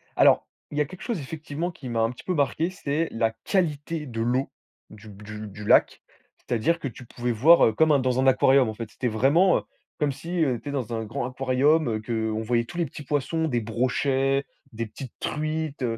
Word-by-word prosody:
Alors, -, -, +5 dB, 0.2 s
il 145 Hz, -, -5 dB
y -, -, +3 dB
a 150 Hz, -, +2 dB
quelque 185 Hz, +6 st, -12 dB
chose 235 Hz, -7 st, -2 dB
effectivement 155 Hz, +4 st, -4 dB
qui 135 Hz, -6 st, -9 dB
m'a 115 Hz, -1 st, 0 dB
un 115 Hz, +1 st, +2 dB
petit 125 Hz, -, -12 dB
peu 185 Hz, -, -1 dB
marqué, 155 Hz, +2 st, +1 dB
c'est 165 Hz, -3 st, -2 dB
la 115 Hz, 0 st, +1 dB
qualité 160 Hz, -4 st, -1 dB
de 115 Hz, -4 st, -4 dB
l'eau 125 Hz, +4 st, 0 dB, 0.4 s
du 110 Hz, 0 st, -13 dB
du 105 Hz, +1 st, -8 dB
du 105 Hz, +1 st, -9 dB
lac. -, -, +4 dB, 0.4 s
C'est-à-dire 145 Hz, +9 st, 0 dB
que 140 Hz, -, -3 dB
tu 125 Hz, 0 st, -10 dB
pouvais 120 Hz, +1 st, -3 dB
voir, 150 Hz, +10 st, +6 dB
heu, 110 Hz, -, +2 dB
comme 150 Hz, +4 st, +4 dB
dans 130 Hz, 0 st, +1 dB
un 130 Hz, -, +3 dB
aquarium, 130 Hz, -1 st, +5 dB
en -, -, -4 dB
fait. 115 Hz, 0 st, -7 dB
C'était 125 Hz, -, -3 dB
vraiment, 145 Hz, -, +4 dB
heu, -, -, -2 dB, 0.4 s
comme 150 Hz, -2 st, +1 dB
si, 170 Hz, +5 st, -2 dB
heu, 125 Hz, -5 st, 0 dB
tu 145 Hz, -, -6 dB
es -, -, -3 dB
dans 125 Hz, -5 st, -3 dB
un 115 Hz, -1 st, -2 dB
grand 115 Hz, +2 st, -4 dB
aquarium, 135 Hz, +3 st, +2 dB
heu, 110 Hz, -1 st, -2 dB
qu'on 110 Hz, -1 st, -2 dB
voyait 115 Hz, +1 st, +1 dB
tous 175 Hz, -, -10 dB
les 170 Hz, -, +1 dB
petits 150 Hz, +1 st, -9 dB
poissons, 150 Hz, +4 st, -1 dB
des 120 Hz, -3 st, +1 dB
brochets, 135 Hz, +4 st, 0 dB, 0.3 s
des 115 Hz, +1 st, -4 dB
petites 120 Hz, +3 st, -9 dB
truites, 155 Hz, -2 st, -3 dB
130 Hz, 220 wpm, -25 LUFS, 115-155 Hz, 0.4 s, voir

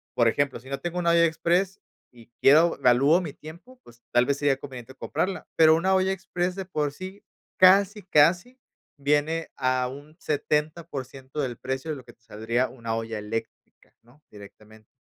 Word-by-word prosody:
por 120 Hz, -, +3 dB
ejemplo, 140 Hz, +3 st, 0 dB
si 130 Hz, +3 st, -15 dB
no 140 Hz, -, -4 dB
tengo 175 Hz, 0 st, -5 dB
una 170 Hz, -1 st, +2 dB
olla 170 Hz, 0 st, +5 dB
express 175 Hz, +4 st, 0 dB, 0.3 s
y 120 Hz, -1 st, -18 dB
quiero 160 Hz, +5 st, +5 dB
valúo 135 Hz, +8 st, +4 dB
mi 160 Hz, -5 st, -5 dB
tiempo, 175 Hz, +12 st, -13 dB
pues 120 Hz, 0 st, -18 dB
tal 120 Hz, -, +4 dB
vez 140 Hz, +1 st, 0 dB
sería 145 Hz, -2 st, +1 dB
conveniente 130 Hz, -2 st, -10 dB
comprarla, 180 Hz, +9 st, -3 dB
pero 160 Hz, -1 st, +6 dB
una 185 Hz, +4 st, +1 dB
olla 190 Hz, 0 st, +2 dB
express 180 Hz, -1 st, -3 dB
de 195 Hz, -, -5 dB
por 150 Hz, -5 st, -2 dB
sí, 190 Hz, +4 st, -9 dB, 0.4 s
casi, 195 Hz, +3 st, +5 dB
casi 180 Hz, -, +2 dB, 0.4 s
viene 150 Hz, +3 st, 0 dB
a 130 Hz, -1 st, 0 dB
un 145 Hz, +4 st, -11 dB
70% 150 Hz, -2 st, -3 dB
del 125 Hz, -5 st, -2 dB
precio 130 Hz, +4 st, -4 dB
de 145 Hz, -, -4 dB
lo 130 Hz, -, -12 dB
que 120 Hz, -1 st, -16 dB
te 115 Hz, -, -38 dB
saldría 115 Hz, +4 st, -2 dB
una 115 Hz, -3 st, -5 dB
olla 115 Hz, -1 st, -4 dB
eléctrica, 110 Hz, +2 st, -8 dB
¿no?, 125 Hz, +6 st, -25 dB
directamente, 105 Hz, +1 st, -15 dB
145 Hz, 175 wpm, -25 LUFS, 125-170 Hz, 0.4 s, pero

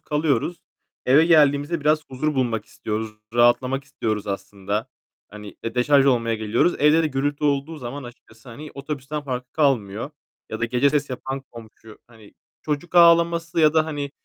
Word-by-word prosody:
kalıyoruz. 150 Hz, +1 st, -1 dB, 0.5 s
Eve 145 Hz, +6 st, +5 dB
geldiğimizde 150 Hz, 0 st, +3 dB
biraz 155 Hz, +1 st, +2 dB
huzur 150 Hz, +4 st, -2 dB
bulmak 120 Hz, -4 st, -1 dB
istiyoruz, 110 Hz, 0 st, -5 dB, 0.2 s
rahatlamak 125 Hz, +3 st, +2 dB
istiyoruz 110 Hz, -7 st, -3 dB
aslında. 100 Hz, +3 st, -4 dB, 0.4 s
Hani, 105 Hz, 0 st, -11 dB
e, 115 Hz, -, -5 dB
deşarj 135 Hz, +2 st, +4 dB
olmaya 115 Hz, -3 st, +2 dB
geliyoruz. 110 Hz, +10 st, +1 dB
Evde 150 Hz, +2 st, +4 dB
de -, -, +1 dB
gürültü 145 Hz, +1 st, -2 dB
olduğu 145 Hz, +2 st, 0 dB
zaman 135 Hz, +2 st, -7 dB
açıkçası 120 Hz, 0 st, -15 dB
hani 145 Hz, +6 st, -10 dB
otobüsten 140 Hz, +1 st, -5 dB
farkı 125 Hz, -2 st, -5 dB
kalmıyor. 125 Hz, -5 st, 0 dB, 0.4 s
Ya 110 Hz, -, -5 dB
da -, -, +1 dB
gece 125 Hz, +4 st, +2 dB
ses 145 Hz, -1 st, -1 dB
yapan 135 Hz, +1 st, -5 dB
komşu, 110 Hz, -1 st, -14 dB
hani, 110 Hz, -3 st, -18 dB, 0.3 s
çocuk 155 Hz, +4 st, -4 dB
ağlaması 170 Hz, -1 st, +4 dB
ya 155 Hz, 0 st, +4 dB
da 160 Hz, -1 st, +4 dB
hani 145 Hz, -3 st, -4 dB
135 Hz, 155 wpm, -22 LUFS, 115-150 Hz, 0.5 s, Eve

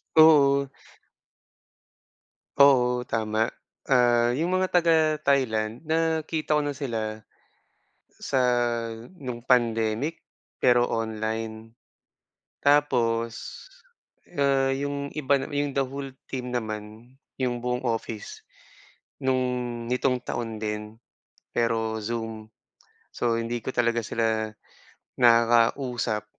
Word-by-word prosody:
Oo. 140 Hz, -3 st, +6 dB, 1.9 s
Oo, 125 Hz, -3 st, +5 dB
tama. 110 Hz, 0 st, 0 dB, 0.4 s
Ah, 120 Hz, -2 st, +4 dB
yung 175 Hz, +4 st, 0 dB
mga 185 Hz, 0 st, +1 dB
taga 170 Hz, -2 st, +4 dB, 0.3 s
Thailand 115 Hz, -4 st, +1 dB
nakita 160 Hz, -1 st, 0 dB
ko 150 Hz, -, +3 dB
na 145 Hz, -1 st, -3 dB
sila 110 Hz, -5 st, -4 dB, 0.8 s
sa 130 Hz, -, -2 dB, 0.8 s
nung 120 Hz, -3 st, -6 dB
pandemic 120 Hz, +4 st, +1 dB, 0.3 s
pero 120 Hz, -1 st, +3 dB
online. 110 Hz, 0 st, -4 dB, 0.8 s
Tapos, 120 Hz, -6 st, +2 dB, 1.0 s
ah, 135 Hz, -2 st, +2 dB
'yong 140 Hz, +1 st, -3 dB
iba 140 Hz, -2 st, +2 dB
'yong 145 Hz, -1 st, -2 dB
the 135 Hz, -, +2 dB
whole 135 Hz, +1 st, -6 dB, 0.2 s
team 125 Hz, -2 st, -5 dB
naman, 110 Hz, 0 st, -5 dB, 0.2 s
'yong 125 Hz, -2 st, -1 dB
buong 125 Hz, +1 st, -2 dB
office 115 Hz, -2 st, -4 dB, 0.8 s
no'ng 125 Hz, -2 st, -1 dB
nitong 125 Hz, 0 st, +1 dB
taon 115 Hz, -2 st, -4 dB
din 105 Hz, 0 st, -4 dB, 0.6 s
pero 115 Hz, -1 st, 0 dB
Zoom, 110 Hz, 0 st, -5 dB, 0.6 s
so 120 Hz, -1 st, 0 dB
hindi 120 Hz, +1 st, -3 dB
ko -, -, -5 dB
talaga 120 Hz, -1 st, +2 dB
sila 110 Hz, -1 st, 0 dB, 0.7 s
nakakausap 115 Hz, -1 st, +3 dB
120 Hz, 95 wpm, -26 LUFS, 115-140 Hz, 1.9 s, Oo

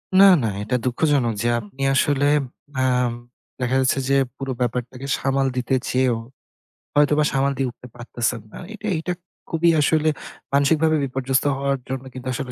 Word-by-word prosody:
না, 195 Hz, +1 st, +9 dB, 0.2 s
না, -, -, +1 dB, 0.2 s
এটা 110 Hz, +4 st, -1 dB
দুঃখজনক 130 Hz, -1 st, +1 dB
যে 120 Hz, -, 0 dB
আপনি 115 Hz, +5 st, -11 dB
আসলে 145 Hz, +1 st, +2 dB, 0.6 s
আম 125 Hz, -2 st, +2 dB, 0.5 s
দেখা 125 Hz, +1 st, 0 dB
যাচ্ছে 130 Hz, +1 st, +2 dB
যে 140 Hz, -, +4 dB, 0.2 s
পুরো 135 Hz, -1 st, -4 dB
ব্যাপারটাকে 125 Hz, +2 st, -3 dB
সামাল 135 Hz, 0 st, +1 dB
দিতে 125 Hz, +2 st, -1 dB, 0.2 s
চেয়েও 125 Hz, -2 st, +2 dB, 0.8 s
হয়তোবা 150 Hz, +1 st, +4 dB
সামাল 135 Hz, +1 st, +2 dB
দিয়ে 135 Hz, -2 st, 0 dB
উঠতে 125 Hz, +1 st, -14 dB
পারতেছেন 120 Hz, -1 st, -2 dB
না। -, -, -10 dB, 0.2 s
এটা 215 Hz, 0 st, -7 dB
এটা 180 Hz, +3 st, -2 dB, 0.4 s
খুবই 170 Hz, +1 st, +2 dB
আসলে 155 Hz, +1 st, +3 dB, 0.4 s
মানসিকভাবে 155 Hz, +3 st, +3 dB
বিপর্যস্ত 135 Hz, 0 st, 0 dB
হওয়ার 140 Hz, 0 st, -1 dB
জন্য 130 Hz, 0 st, -3 dB
কিন্তু 130 Hz, 0 st, -8 dB
আসলে 125 Hz, 0 st, -4 dB
135 Hz, 155 wpm, -22 LUFS, 125-145 Hz, 0.8 s, না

